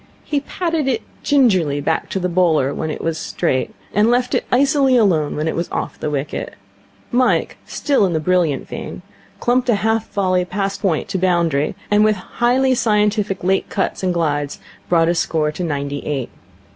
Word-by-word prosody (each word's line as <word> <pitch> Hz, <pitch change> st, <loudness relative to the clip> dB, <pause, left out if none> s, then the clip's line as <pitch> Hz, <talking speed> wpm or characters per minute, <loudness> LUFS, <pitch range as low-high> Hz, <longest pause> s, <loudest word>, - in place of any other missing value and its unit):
He 290 Hz, -, -1 dB
patted 325 Hz, 0 st, -2 dB
it 235 Hz, -4 st, 0 dB, 0.2 s
gingerly 190 Hz, -, +3 dB
back 160 Hz, +3 st, -1 dB
to 190 Hz, -, -2 dB
the 180 Hz, -, 0 dB
bowler 165 Hz, -6 st, +2 dB
when 155 Hz, -, -3 dB
it 155 Hz, -, -4 dB
was 165 Hz, -1 st, -1 dB
straight, 130 Hz, -, -1 dB, 0.2 s
and 210 Hz, +3 st, +3 dB
left 245 Hz, +1 st, +1 dB
it -, -, +1 dB
icily 270 Hz, 0 st, +4 dB
alone 170 Hz, -10 st, +2 dB
when 150 Hz, +2 st, -2 dB
it -, -, -1 dB
was 170 Hz, -, -2 dB
off -, -, -4 dB
the -, -, -2 dB
wicket. 145 Hz, 0 st, -4 dB, 0.6 s
Mike, 250 Hz, 0 st, +1 dB
still 280 Hz, -7 st, +1 dB
in 175 Hz, -, -2 dB
the 160 Hz, -, +1 dB
brilliant 165 Hz, -4 st, +1 dB
vein, -, -, -7 dB, 0.4 s
clumped 250 Hz, +1 st, +1 dB
a 235 Hz, -, +5 dB
half 220 Hz, +2 st, 0 dB
volley 185 Hz, -3 st, +1 dB
past 195 Hz, +2 st, -3 dB
point 175 Hz, -7 st, 0 dB
to 195 Hz, -1 st, -1 dB
the 185 Hz, -, +2 dB
boundary, 165 Hz, -5 st, +1 dB, 0.2 s
and 210 Hz, 0 st, +5 dB
with 215 Hz, 0 st, +3 dB
highly 245 Hz, +7 st, +1 dB
scientific 210 Hz, -4 st, +1 dB
late 190 Hz, +1 st, +1 dB
cuts 195 Hz, -, -2 dB
and 185 Hz, -1 st, +1 dB
glides 145 Hz, -4 st, -1 dB, 0.3 s
brought 165 Hz, -2 st, +4 dB
his 170 Hz, 0 st, +1 dB
score 155 Hz, -2 st, 0 dB
to 160 Hz, +4 st, -5 dB
ninety 145 Hz, -3 st, -2 dB
eight. 140 Hz, -5 st, -3 dB
185 Hz, 185 wpm, -19 LUFS, 160-225 Hz, 0.6 s, a